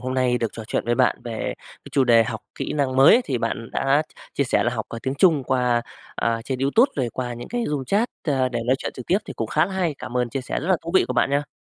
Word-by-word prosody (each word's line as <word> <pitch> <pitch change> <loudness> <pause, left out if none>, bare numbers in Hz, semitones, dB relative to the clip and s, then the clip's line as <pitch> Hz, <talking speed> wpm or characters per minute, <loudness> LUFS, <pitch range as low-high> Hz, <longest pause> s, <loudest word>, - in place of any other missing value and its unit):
Hôm 130 0 -3
nay 125 -1 +2
được 115 -1 0
trò 110 - -8
chuyện - - -1
với 120 +1 +1
bạn 125 0 +3
về 115 -2 -3
cái - - -16
chủ 135 - +3
đề 115 -2 +5
học 110 -1 -4 0.2
kỹ - - -3
năng 135 -3 0
mới, 140 - +7
thì 130 -3 -1
bạn 115 0 -3
đã 140 +3 +2 0.3
chia - - +1
sẻ - - +2
là - - +2
học, - - -3
ờ, 115 - -6
tiếng 130 +1 -2
Trung 155 -4 +3
qua, 125 -2 +1 0.3
ờ, 115 -1 -1
trên 130 -2 -3
YouTube 145 - +3
rồi 130 -4 0
qua 125 -2 -3
những 120 +1 -8
cái 240 0 -2
room 145 -3 -2
chat, 210 - +1 0.2
ơ, 135 -4 +1
để 120 -2 -3
nói 130 +2 +3
chuyện - - -4
trực 125 - -9
tiếp 190 - +3
thì - - -7
cũng 115 - -3
khá 155 +8 +2
là 195 - -7
hay. 180 -5 0
Cảm 125 - -6
ơn 125 -1 +1
chia 135 - -2
sẻ 130 - -3
rất 155 - -5
là 185 - +4
thú 165 - -4
vị 190 - +5
của - - 0
bạn 125 - +2
nha. 145 +1 0
130 Hz, 295 wpm, -23 LUFS, 120-145 Hz, 0.3 s, mới